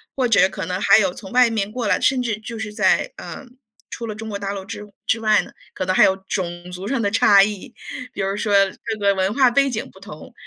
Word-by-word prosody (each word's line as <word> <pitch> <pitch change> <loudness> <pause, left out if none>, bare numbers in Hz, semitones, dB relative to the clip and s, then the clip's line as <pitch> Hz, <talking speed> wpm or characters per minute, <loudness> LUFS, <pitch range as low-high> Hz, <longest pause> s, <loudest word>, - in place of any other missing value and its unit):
或 265 - 0
者 225 -5 +4
可 190 -2 -6
能 180 0 -2
还 195 +1 +5
有 190 -4 +1
从 195 +1 -11
外 250 -1 +5
面 210 -3 -2
过 240 +2 -4
来， - - +2
甚 260 -1 +2
至 230 -4 -2
就 230 +1 -8
是 215 -1 -5
在， - - +2
呃， - - -9 0.4
除 235 - -6
了 215 - -4
中 220 +1 -7
国 205 - -4
大 200 0 -3
陆 195 -1 -6
之 210 +2 -8 0.2
之 225 - +1
外 215 -1 +3
呢？ - - -12 0.2
可 185 - -4
能 185 0 0
还 - - +6
有 190 - +4
种 175 -2 -4
族 180 +2 -7
上 265 0 -1
的 205 - +1
差 200 -1 +5
异， 205 -1 -4 0.4
比 - - -4
如 195 +1 -1
说 210 -1 -1 0.3
这 225 -1 -3
个 200 -1 +2
文 190 +1 0
化 260 0 +4
背 275 +3 +2
景 225 -4 -4
不 190 - -18
同， 190 -6 -12
210 Hz, 275 characters per minute, -21 LUFS, 195-230 Hz, 0.4 s, 还